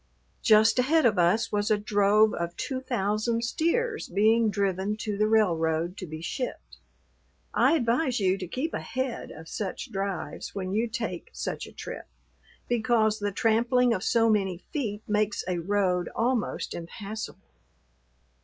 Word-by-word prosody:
Just 220 Hz, +2 st, +5 dB
ahead 300 Hz, +4 st, +3 dB
of 210 Hz, -5 st, +3 dB
us 180 Hz, +6 st, +3 dB
was 205 Hz, 0 st, 0 dB
a 215 Hz, -, +4 dB
drove 205 Hz, +1 st, +3 dB
of 170 Hz, 0 st, -3 dB
two 260 Hz, -2 st, -3 dB
thousand 230 Hz, -1 st, -1 dB
steers 430 Hz, -, 0 dB
being 220 Hz, +4 st, +3 dB
driven 200 Hz, +1 st, -1 dB
to 215 Hz, -1 st, -3 dB
the 215 Hz, +1 st, +2 dB
railroad 170 Hz, -5 st, +2 dB
to 185 Hz, -, -6 dB
be 155 Hz, 0 st, -7 dB
shipped. 250 Hz, +8 st, -5 dB, 0.8 s
I -, -, +4 dB
advise 250 Hz, -2 st, +1 dB
you 190 Hz, -2 st, +2 dB
to 185 Hz, -, -5 dB
keep 275 Hz, -, -3 dB
ahead 260 Hz, -2 st, -3 dB
of 160 Hz, +1 st, -11 dB
such 195 Hz, 0 st, -5 dB
drives 195 Hz, 0 st, -4 dB
when 190 Hz, -1 st, -3 dB
you 225 Hz, +3 st, +1 dB
take 225 Hz, -7 st, -4 dB
such -, -, -4 dB
a -, -, -12 dB
trip, -, -, -8 dB, 0.6 s
because 225 Hz, -2 st, +2 dB
the 205 Hz, 0 st, -1 dB
trampling 235 Hz, +4 st, +3 dB
of 185 Hz, -, -2 dB
so 230 Hz, -1 st, +3 dB
many 195 Hz, -5 st, +1 dB, 0.2 s
feet 215 Hz, -8 st, -3 dB
makes 210 Hz, 0 st, 0 dB
a 180 Hz, -1 st, -1 dB
road 180 Hz, -1 st, 0 dB
almost 240 Hz, -1 st, -1 dB
impassable. 200 Hz, +5 st, -7 dB
215 Hz, 150 wpm, -27 LUFS, 195-235 Hz, 0.8 s, Just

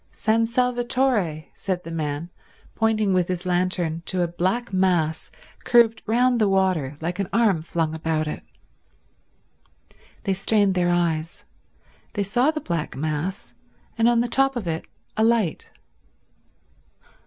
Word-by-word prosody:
"San 225 Hz, +1 st, +1 dB
Salvatore," 240 Hz, -, 0 dB
said 185 Hz, -2 st, -3 dB
the 165 Hz, -, -8 dB
man 155 Hz, +1 st, -3 dB, 0.4 s
pointing 215 Hz, -3 st, +1 dB
with 180 Hz, -2 st, +2 dB
his 180 Hz, 0 st, -3 dB
lantern 175 Hz, -2 st, 0 dB
to 185 Hz, -1 st, 0 dB
a -, -, 0 dB
black 185 Hz, +7 st, -1 dB
mass 175 Hz, -4 st, +1 dB, 0.3 s
curved 235 Hz, -2 st, +4 dB
round 245 Hz, +1 st, +3 dB
the 210 Hz, -, +4 dB
water 185 Hz, -8 st, +1 dB
like 175 Hz, +3 st, -3 dB
an 195 Hz, -, -1 dB
arm 215 Hz, -8 st, +3 dB
flung 160 Hz, -1 st, -2 dB
about 160 Hz, -1 st, -1 dB
it. 150 Hz, -, -4 dB, 1.8 s
They 195 Hz, -, +1 dB
strained 200 Hz, +1 st, +2 dB
their 180 Hz, -1 st, +1 dB
eyes. 165 Hz, -2 st, -1 dB, 0.7 s
They 205 Hz, -, 0 dB
saw 240 Hz, +8 st, +2 dB
the 315 Hz, -1 st, -1 dB
black 170 Hz, -3 st, -3 dB
mass, 155 Hz, +5 st, -3 dB, 0.4 s
and 230 Hz, +1 st, +3 dB
on 235 Hz, -1 st, +3 dB
the 240 Hz, -, 0 dB
top 270 Hz, +2 st, +2 dB
of 235 Hz, -5 st, -3 dB
it 160 Hz, 0 st, -3 dB, 0.3 s
a 220 Hz, -, +3 dB
light. 225 Hz, -7 st, +1 dB
185 Hz, 140 wpm, -24 LUFS, 165-225 Hz, 1.8 s, curved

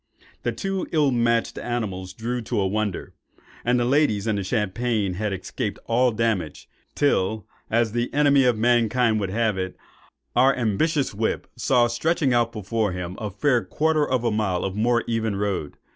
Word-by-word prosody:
The -, -, -1 dB
two 195 Hz, -2 st, -3 dB
ill 150 Hz, -4 st, +3 dB
matched 120 Hz, -1 st, +1 dB
animals 95 Hz, -6 st, -4 dB
drew 120 Hz, +4 st, -3 dB
to 110 Hz, -, -2 dB
a 95 Hz, -, +1 dB
wonder; 105 Hz, 0 st, -2 dB, 0.5 s
and 125 Hz, +1 st, +2 dB
the 120 Hz, -, +1 dB
ladies 125 Hz, -6 st, +2 dB
and 110 Hz, -2 st, 0 dB
the -, -, -3 dB
champagne 105 Hz, 0 st, -1 dB
had 105 Hz, +3 st, -2 dB
escaped 95 Hz, -1 st, -4 dB
all 125 Hz, +2 st, +3 dB
damage, 110 Hz, -8 st, -2 dB, 0.3 s
till, 110 Hz, -7 st, +1 dB, 0.2 s
as 115 Hz, -1 st, +2 dB
the 120 Hz, +2 st, -1 dB
enemy 140 Hz, -2 st, +4 dB
of 125 Hz, -3 st, +3 dB
mankind 115 Hz, 0 st, +2 dB
would 100 Hz, -2 st, -2 dB
have 110 Hz, -1 st, 0 dB
it, 95 Hz, 0 st, -4 dB, 0.6 s
our 130 Hz, +3 st, +5 dB
ambitious 130 Hz, +6 st, 0 dB
whip 110 Hz, +2 st, -1 dB
saw 125 Hz, -3 st, +3 dB
stretching 135 Hz, +3 st, +1 dB
out 120 Hz, -1 st, +2 dB
before 105 Hz, -1 st, -2 dB
him 90 Hz, 0 st, -5 dB
a 105 Hz, -3 st, -3 dB
fair 120 Hz, +5 st, +1 dB
quarter 155 Hz, 0 st, +1 dB
of 130 Hz, -2 st, +1 dB
a 115 Hz, -, +1 dB
mile 105 Hz, -4 st, 0 dB
of 95 Hz, 0 st, -3 dB
more 120 Hz, +2 st, +2 dB
even 110 Hz, -3 st, -1 dB
road. 100 Hz, -7 st, -2 dB
115 Hz, 175 wpm, -24 LUFS, 105-125 Hz, 0.6 s, our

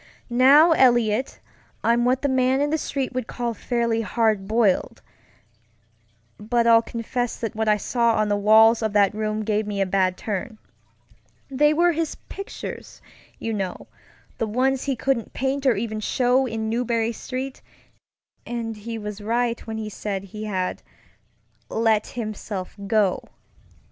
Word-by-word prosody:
Now, 275 Hz, +7 st, +6 dB
Eliot, 240 Hz, -4 st, +3 dB, 0.4 s
I'm 235 Hz, +1 st, +3 dB
what 255 Hz, +2 st, +1 dB
the -, -, +3 dB
man 260 Hz, 0 st, +2 dB
in 290 Hz, +1 st, 0 dB
the 315 Hz, -, +2 dB
street 275 Hz, -3 st, -3 dB
would 255 Hz, -2 st, -3 dB
call 240 Hz, -1 st, -3 dB
fairly 235 Hz, 0 st, -1 dB
"hard 215 Hz, -3 st, 0 dB
boiled," 215 Hz, -3 st, +1 dB, 1.4 s
but 235 Hz, +2 st, 0 dB
I'll 230 Hz, -1 st, +6 dB
confess 235 Hz, +1 st, -3 dB
that 225 Hz, -1 st, -4 dB
what 220 Hz, 0 st, -2 dB
I 210 Hz, 0 st, +4 dB
saw 235 Hz, +2 st, +1 dB
on 215 Hz, 0 st, +1 dB
the 205 Hz, -, +1 dB
walls 220 Hz, +3 st, +5 dB
of 220 Hz, -2 st, -1 dB
that 205 Hz, -1 st, +4 dB
room 215 Hz, 0 st, -2 dB
gave 215 Hz, 0 st, -1 dB
me 205 Hz, -1 st, -3 dB
a 195 Hz, -, +2 dB
bad 185 Hz, -1 st, +1 dB
turn. 215 Hz, +2 st, -4 dB, 0.9 s
They 295 Hz, +3 st, +4 dB
were 345 Hz, +3 st, +3 dB
his 325 Hz, -1 st, -2 dB
pictures, 395 Hz, -, -8 dB, 0.4 s
you 225 Hz, -, -3 dB
knowŌĆöthe 195 Hz, -4 st, -4 dB, 0.6 s
ones 255 Hz, +4 st, 0 dB
he 275 Hz, -2 st, 0 dB
couldn't 250 Hz, -2 st, -1 dB
paint 270 Hz, +1 st, -1 dB
or 250 Hz, -, +4 dB
even 215 Hz, +1 st, -3 dB
show 250 Hz, +4 st, +1 dB
in 220 Hz, -1 st, -3 dB
Marlborough 230 Hz, 0 st, 0 dB
StreetŌĆöand 240 Hz, -2 st, -8 dB
he 225 Hz, +2 st, -6 dB
was 210 Hz, -1 st, -6 dB
right 235 Hz, +2 st, 0 dB
when 220 Hz, 0 st, -4 dB
he 220 Hz, -1 st, -4 dB
said 200 Hz, -2 st, -4 dB
he 210 Hz, +2 st, -8 dB
had 185 Hz, -3 st, -2 dB, 0.9 s
"let 220 Hz, -1 st, +1 dB
himself 215 Hz, -5 st, -6 dB
go." 210 Hz, -3 st, +2 dB
230 Hz, 150 wpm, -23 LUFS, 215-250 Hz, 1.4 s, Now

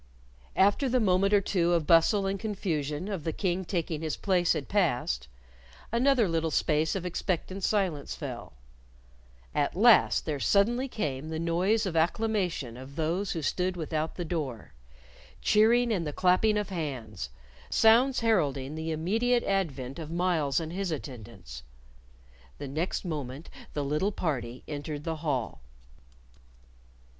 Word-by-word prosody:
After 205 Hz, +8 st, +3 dB
the 255 Hz, +1 st, +2 dB
moment 195 Hz, -2 st, +3 dB
or 205 Hz, -1 st, +5 dB
two 175 Hz, -3 st, +1 dB
of 165 Hz, -3 st, +1 dB
bustle 175 Hz, +5 st, +4 dB
and 195 Hz, 0 st, -1 dB
confusion 170 Hz, -6 st, -2 dB
of 195 Hz, -7 st, -4 dB
the 160 Hz, -, -1 dB
King 185 Hz, +1 st, -1 dB
taking 170 Hz, -4 st, -2 dB
his 155 Hz, -2 st, -2 dB
place 180 Hz, -3 st, +2 dB
had -, -, -4 dB
passed, 125 Hz, -, 0 dB, 0.6 s
another 240 Hz, -1 st, +3 dB
little 165 Hz, -1 st, 0 dB
space 155 Hz, +1 st, +1 dB
of 185 Hz, -2 st, -3 dB
expectant 185 Hz, +1 st, -3 dB
silence 180 Hz, -10 st, 0 dB
fell. -, -, -7 dB, 1.0 s
At 145 Hz, -, 0 dB
last 220 Hz, +2 st, +5 dB
there 150 Hz, -3 st, -2 dB
suddenly 235 Hz, -, +2 dB
came 150 Hz, -, -3 dB
the 160 Hz, -, -3 dB
noise 180 Hz, +7 st, +1 dB
of 180 Hz, -4 st, -3 dB
acclamation 175 Hz, -, 0 dB
of 130 Hz, +2 st, -10 dB
those 170 Hz, +5 st, -1 dB
who 160 Hz, -, -4 dB
stood 180 Hz, +4 st, -1 dB
without 160 Hz, -1 st, -2 dB
the 175 Hz, -, -4 dB
door 145 Hz, -, -4 dB, 0.7 s
cheering 235 Hz, +3 st, +4 dB
and 170 Hz, -6 st, -1 dB
the 150 Hz, -, -4 dB
clapping 185 Hz, +5 st, +3 dB
of 210 Hz, 0 st, -2 dB
hands 125 Hz, -, -5 dB, 0.4 s
sounds 245 Hz, +4 st, +4 dB
heralding 145 Hz, -11 st, +1 dB
the 160 Hz, +1 st, -4 dB
immediate 225 Hz, +10 st, +1 dB
advent 140 Hz, -9 st, -2 dB
of 155 Hz, -2 st, -6 dB
Myles 165 Hz, -5 st, +1 dB
and 165 Hz, 0 st, -5 dB
his 195 Hz, 0 st, -2 dB
attendants. 110 Hz, -, -7 dB, 1.0 s
The 145 Hz, -, -6 dB
next 160 Hz, +8 st, -2 dB
moment 145 Hz, -2 st, -5 dB, 0.2 s
the 145 Hz, -, -1 dB
little 150 Hz, +8 st, 0 dB
party 130 Hz, -, -3 dB
entered 145 Hz, 0 st, -5 dB
the 160 Hz, 0 st, -3 dB
hall. 130 Hz, -, -2 dB
170 Hz, 145 wpm, -28 LUFS, 150-200 Hz, 1.0 s, or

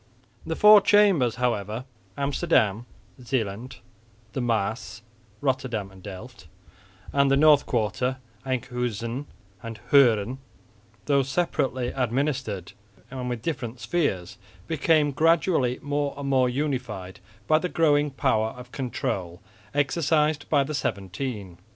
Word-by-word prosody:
The 160 Hz, -, -1 dB
four 210 Hz, +2 st, +8 dB
chambers 190 Hz, -, +4 dB
however 115 Hz, -1 st, -2 dB, 0.3 s
Amsterdam, 135 Hz, -, +1 dB, 0.3 s
Zeeland, 120 Hz, -1 st, -3 dB, 0.6 s
the 130 Hz, -, -2 dB
Maas 115 Hz, 0 st, -2 dB, 0.4 s
(Rotterdam 130 Hz, -7 st, -1 dB
and 95 Hz, -1 st, -15 dB
Delft) 100 Hz, 0 st, -10 dB, 0.7 s
and 140 Hz, 0 st, +3 dB
the 135 Hz, -, +4 dB
North 150 Hz, -1 st, +5 dB
Quarter 125 Hz, +3 st, -1 dB, 0.3 s
(Enkhuizen 125 Hz, 0 st, -3 dB, 0.3 s
and 115 Hz, -1 st, -7 dB
Hoorn) 125 Hz, -3 st, +4 dB, 0.7 s
though 140 Hz, -1 st, +3 dB
separately 135 Hz, -3 st, -1 dB
administered 125 Hz, -, -2 dB, 0.4 s
and 125 Hz, -2 st, -4 dB
with 120 Hz, -2 st, -4 dB
different 130 Hz, -7 st, -4 dB
spheres, 110 Hz, -, -2 dB, 0.3 s
became 155 Hz, +1 st, +2 dB
gradually 160 Hz, -4 st, +2 dB
more 145 Hz, 0 st, -1 dB
and 140 Hz, -1 st, -5 dB
more 130 Hz, -2 st, +3 dB
unified 125 Hz, -9 st, -3 dB, 0.3 s
by 155 Hz, 0 st, +4 dB
the 180 Hz, -, -3 dB
growing 150 Hz, -3 st, +3 dB
power 110 Hz, -5 st, 0 dB
of 125 Hz, -1 st, -11 dB
control 95 Hz, -9 st, -3 dB, 0.3 s
exercised 150 Hz, +1 st, +1 dB
by 145 Hz, -3 st, +4 dB
the 150 Hz, +3 st, -5 dB
Seventeen. 100 Hz, -, -4 dB
130 Hz, 115 wpm, -25 LUFS, 110-145 Hz, 0.7 s, four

